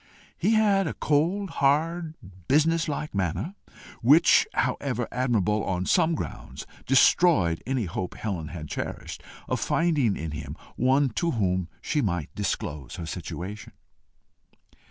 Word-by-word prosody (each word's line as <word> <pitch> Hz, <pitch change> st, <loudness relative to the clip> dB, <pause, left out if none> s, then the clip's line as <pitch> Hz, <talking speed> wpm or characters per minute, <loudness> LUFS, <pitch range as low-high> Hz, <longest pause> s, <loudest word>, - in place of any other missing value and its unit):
He 220 Hz, -, +2 dB
had 200 Hz, -4 st, +3 dB
a -, -, -4 dB
cold, 170 Hz, +6 st, 0 dB
hard, 160 Hz, +4 st, +1 dB, 0.3 s
business 160 Hz, +4 st, +3 dB
like 150 Hz, 0 st, -4 dB
manner, 100 Hz, -, -2 dB, 0.5 s
which, 150 Hz, +8 st, +6 dB
however 125 Hz, -2 st, -1 dB
admirable 110 Hz, -5 st, +1 dB
on 90 Hz, -1 st, -2 dB
some 165 Hz, -, +3 dB
grounds, -, -, -7 dB, 0.2 s
destroyed 130 Hz, -, +4 dB
any 130 Hz, -4 st, 0 dB
hope 90 Hz, +1 st, -4 dB
Helen 90 Hz, -8 st, -4 dB
had 75 Hz, -1 st, -7 dB
cherished -, -, -5 dB, 0.3 s
of -, -, -1 dB
finding 150 Hz, -, +1 dB
in 80 Hz, -1 st, -5 dB
him 75 Hz, +1 st, -7 dB, 0.2 s
one 135 Hz, +3 st, +3 dB
to 170 Hz, -, +1 dB
whom 95 Hz, -, 0 dB
she 150 Hz, -, 0 dB
might 90 Hz, -, -2 dB
disclose 70 Hz, -4 st, -3 dB
her 85 Hz, -, -6 dB
situation. 90 Hz, +5 st, -6 dB
125 Hz, 130 wpm, -26 LUFS, -, 0.5 s, which